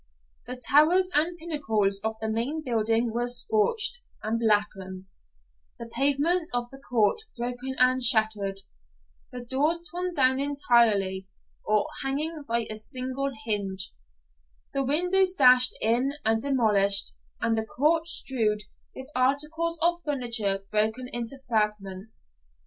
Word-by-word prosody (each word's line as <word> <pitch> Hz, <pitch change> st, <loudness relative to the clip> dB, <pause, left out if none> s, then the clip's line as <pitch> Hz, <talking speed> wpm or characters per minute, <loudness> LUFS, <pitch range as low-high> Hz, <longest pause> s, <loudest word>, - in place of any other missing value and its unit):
The 250 Hz, -, -5 dB
towers 315 Hz, +8 st, +3 dB
and 330 Hz, +4 st, 0 dB
pinnacles 220 Hz, -12 st, -1 dB
of 220 Hz, +1 st, -3 dB
the 220 Hz, -, -3 dB
main 240 Hz, +8 st, -2 dB
building 225 Hz, -1 st, 0 dB
were 240 Hz, +1 st, -1 dB
scorched 245 Hz, -, +2 dB, 0.2 s
and 220 Hz, +2 st, -1 dB
blackened; 195 Hz, -4 st, -1 dB, 0.7 s
the 235 Hz, -, -8 dB
pavement 285 Hz, +8 st, 0 dB
of 240 Hz, 0 st, -3 dB
the 270 Hz, -, -11 dB
court 245 Hz, -, 0 dB, 0.2 s
broken 245 Hz, +2 st, -4 dB
and 255 Hz, 0 st, +3 dB
shattered, 215 Hz, -5 st, +4 dB, 0.7 s
the 245 Hz, -1 st, -8 dB
doors 290 Hz, +7 st, +1 dB
torn 360 Hz, +1 st, -3 dB
down 260 Hz, -2 st, +2 dB
entirely, 230 Hz, -9 st, +1 dB, 0.4 s
or 210 Hz, -1 st, +1 dB, 0.2 s
hanging 295 Hz, +3 st, -3 dB
by 230 Hz, 0 st, 0 dB
a 215 Hz, -, -4 dB
single 255 Hz, +4 st, -3 dB, 0.2 s
hinge, 195 Hz, -3 st, -1 dB, 0.8 s
the 275 Hz, -, 0 dB
windows 360 Hz, +7 st, +2 dB
dashed 255 Hz, -5 st, +5 dB
in 245 Hz, +5 st, +1 dB
and 225 Hz, 0 st, +1 dB
demolished, 210 Hz, -7 st, +2 dB, 0.3 s
and 230 Hz, 0 st, 0 dB
the 220 Hz, -, -1 dB
court 315 Hz, +8 st, +1 dB
strewed 215 Hz, -9 st, +1 dB, 0.3 s
with 260 Hz, -, -8 dB
articles 300 Hz, +6 st, 0 dB
of 345 Hz, 0 st, +1 dB
furniture 230 Hz, -9 st, -1 dB
broken 220 Hz, +4 st, -1 dB
into 240 Hz, +2 st, -5 dB
fragments. 210 Hz, -, -3 dB
245 Hz, 125 wpm, -26 LUFS, 220-280 Hz, 0.8 s, dashed